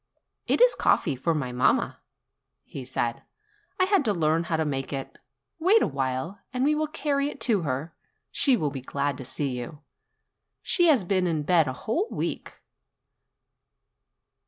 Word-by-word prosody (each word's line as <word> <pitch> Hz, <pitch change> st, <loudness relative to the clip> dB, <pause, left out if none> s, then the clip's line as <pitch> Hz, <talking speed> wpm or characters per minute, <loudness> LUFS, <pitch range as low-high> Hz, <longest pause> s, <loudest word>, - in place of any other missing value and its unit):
"It -, -, +2 dB
is -, -, +7 dB
coffee 150 Hz, -6 st, +2 dB
for 160 Hz, +6 st, 0 dB
mamma," 125 Hz, -4 st, +1 dB, 0.6 s
he 135 Hz, -, -8 dB
said; 120 Hz, -2 st, -2 dB, 0.6 s
"I -, -, +5 dB
had 385 Hz, -3 st, +3 dB
to 210 Hz, -, +2 dB
learn 165 Hz, 0 st, +1 dB
how 160 Hz, 0 st, -1 dB
to 160 Hz, -, 0 dB
make 135 Hz, -2 st, -3 dB
it. 135 Hz, -2 st, -6 dB, 0.4 s
Wait 385 Hz, +7 st, +4 dB
a -, -, +2 dB
while, 135 Hz, +6 st, -3 dB
and 250 Hz, 0 st, -1 dB
we 295 Hz, +2 st, +3 dB
will 305 Hz, 0 st, 0 dB
carry 290 Hz, -2 st, -1 dB
it 285 Hz, -, -10 dB
to 215 Hz, -6 st, +2 dB
her; 150 Hz, +2 st, -3 dB, 0.4 s
she 270 Hz, -4 st, +4 dB
will 150 Hz, -7 st, -1 dB
be 135 Hz, -2 st, -6 dB
glad 140 Hz, +2 st, -2 dB
to -, -, -6 dB
see 140 Hz, +3 st, -2 dB
you. 145 Hz, +5 st, -8 dB, 0.8 s
She 350 Hz, -1 st, +3 dB
has 275 Hz, -, +4 dB
been 185 Hz, 0 st, +1 dB
in 160 Hz, -3 st, -1 dB
bed 165 Hz, -1 st, +3 dB
a 130 Hz, -, -2 dB
whole 325 Hz, -, -2 dB
week. -, -, -5 dB
160 Hz, 165 wpm, -26 LUFS, -, 0.8 s, is